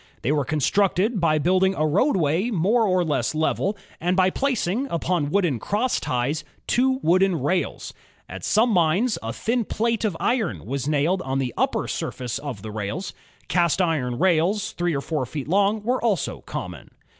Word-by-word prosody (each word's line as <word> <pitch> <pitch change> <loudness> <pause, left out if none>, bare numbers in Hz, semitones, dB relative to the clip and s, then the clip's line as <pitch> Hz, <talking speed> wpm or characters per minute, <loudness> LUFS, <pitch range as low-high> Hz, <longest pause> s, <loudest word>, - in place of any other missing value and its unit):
They 130 - +1
were 145 -2 +1
constructed 195 - +1
by 155 -2 +3
building 185 +4 +2
a 155 - +1
roadway 175 - +2
more 215 +3 +2
or 185 -1 +2
less 145 -3 -1
level, 185 +6 0 0.2
and 180 +2 0
by 185 0 +4
placing, 255 -2 -1
upon 170 - -1
wooden 175 - +1
crossties, 155 - -1 0.2
two 260 +1 +2
wooden 185 0 +3
rails. 175 +8 -2 0.3
At - - -8
some 230 +3 +3
mines, 185 +6 +2
a - - -4
thin 235 +1 -1
plate 230 +2 -1
of 200 -7 -1
iron 240 -7 -1
was 135 +3 -3
nailed 155 +5 +1
on 135 -3 -2
the 130 -3 -2
upper - - 0
surface 125 -2 -4
of 130 -9 -7
the 110 - -6
rails. 105 - -4 0.3
Cast 170 -1 +2
iron 150 -9 0
rails, 190 +4 +2
three 175 -2 -1
or 140 - -1
four 150 -1 -2
feet 140 +1 -5
long, 200 +4 +2
were 250 +3 0
also 210 -7 0
common. - - -6
180 Hz, 170 wpm, -23 LUFS, 150-205 Hz, 0.3 s, by